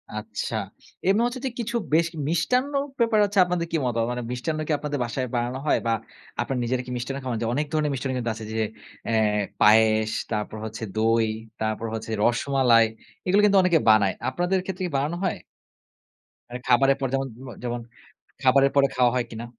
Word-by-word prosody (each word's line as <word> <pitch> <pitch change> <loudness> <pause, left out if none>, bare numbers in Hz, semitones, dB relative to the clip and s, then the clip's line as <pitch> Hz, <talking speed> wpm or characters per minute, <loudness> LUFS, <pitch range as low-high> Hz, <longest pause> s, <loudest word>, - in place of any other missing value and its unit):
আচ্ছা। 110 +1 -4 0.5
এমনি 200 +4 +4
হচ্ছে 245 +1 -3
যে - - +1
কিছু 235 +1 -3 0.2
বেশ 165 +1 +4 0.2
মিষ্টান্ন 250 - +1 0.3
ব্যাপারে 230 -2 +3
হছে 205 0 -5
আপনাদের 175 -1 -1
কি 165 - +1
মতামত? 115 -1 0
মানে 125 0 -3
মিষ্টান্ন 155 +6 -2
কি - - -1
আপনাদের 145 -1 -3
বাসায় 130 +2 -3
বানানো 120 +2 -1
হয়? - - +3
বা 115 - +3 0.5
আপনার 125 +2 -2
নিজেরা 125 +1 0
কি 125 - -7
মিষ্টান্ন 130 +3 -4
খান? 125 -3 -2
যে 115 - 0
অনেক 150 +3 0
ধরনের 150 -1 +1
মিষ্টান্ন 130 0 -2
কিন্তু 115 -2 -1
আছে 110 -1 -8
যে 110 - -1 0.5
অ্যাঁ 110 -2 +2 0.2
পায়েস, 110 0 +5 0.2
তারপর 105 0 -3
হচ্ছে 110 +1 -6
দই, 115 +1 +3 0.3
তারপর 110 +1 -1
হচ্ছে 110 0 -5
রসমালাই 120 -1 +4 0.4
এগুলো 195 +3 +4
কিন্তু 200 -1 +4
অনেকে 175 -3 +4
বানায়। 105 -3 +5 0.2
আপনাদের 180 +2 0
ক্ষেত্রে 190 0 -4
কি 175 - -4
বানানো 150 +5 -1
হয়? 185 - 0 1.1
মানে 125 +1 -6
খাবারের 135 +2 +4
পর 135 - 0
যেমন 135 0 0 0.2
ম - - -8
যেমন 120 -1 -3 0.6
খাবারের 135 +1 +5
পরে 140 - +6
খাওয়া 125 -1 +4
হয় 125 -2 0
কিনা? 115 0 -6
130 Hz, 185 wpm, -25 LUFS, 115-160 Hz, 1.1 s, পরে